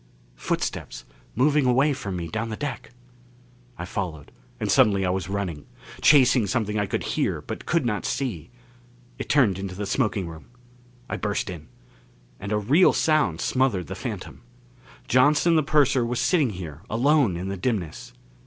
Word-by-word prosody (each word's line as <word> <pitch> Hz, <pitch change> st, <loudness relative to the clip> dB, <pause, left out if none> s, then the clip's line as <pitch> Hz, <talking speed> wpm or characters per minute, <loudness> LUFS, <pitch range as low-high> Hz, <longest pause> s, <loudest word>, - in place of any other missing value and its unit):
Footsteps -, -, -3 dB, 0.3 s
moving 140 Hz, +3 st, +3 dB
away 135 Hz, +4 st, +3 dB
from 100 Hz, -7 st, -5 dB
me 85 Hz, -2 st, -4 dB
down 110 Hz, +5 st, -3 dB
the 110 Hz, -, -4 dB
deck! 135 Hz, -1 st, -5 dB, 0.9 s
I 85 Hz, -, -5 dB
followed; 85 Hz, -6 st, -5 dB, 0.3 s
and -, -, -1 dB
suddenly 100 Hz, -2 st, +4 dB
I 90 Hz, -, +1 dB
was 95 Hz, -1 st, -3 dB
running. 95 Hz, -7 st, -4 dB, 0.3 s
Chasing 130 Hz, -6 st, +5 dB
something 105 Hz, 0 st, -1 dB
I 100 Hz, -, 0 dB
could -, -, -2 dB
hear, -, -, -1 dB
but -, -, -8 dB
could 170 Hz, -5 st, +1 dB
not 105 Hz, -3 st, -1 dB
see. 100 Hz, -, -3 dB, 0.7 s
It -, -, -6 dB
turned 110 Hz, -10 st, +3 dB
into 95 Hz, -1 st, -5 dB
the 100 Hz, +2 st, -4 dB
smoking 105 Hz, -5 st, -1 dB
room. 80 Hz, -1 st, -10 dB, 0.6 s
I -, -, -3 dB
burst 105 Hz, -2 st, -2 dB
in. 80 Hz, -3 st, -9 dB, 0.7 s
And 100 Hz, +2 st, -6 dB
a 105 Hz, -, +2 dB
real 140 Hz, -, +4 dB
sound 150 Hz, -, +1 dB
smothered 125 Hz, -9 st, +1 dB
the -, -, -6 dB
phantom. -, -, -7 dB, 0.7 s
Johnson 145 Hz, +7 st, +4 dB
the 155 Hz, -, +4 dB
purser 140 Hz, -3 st, +2 dB
was 120 Hz, +1 st, -2 dB
sitting 155 Hz, -9 st, +2 dB
here 85 Hz, -6 st, -8 dB
alone 125 Hz, -, +2 dB
in 95 Hz, +2 st, -4 dB
the 100 Hz, -, -3 dB
dimness. 95 Hz, -5 st, -3 dB
105 Hz, 160 wpm, -24 LUFS, 95-135 Hz, 0.9 s, Chasing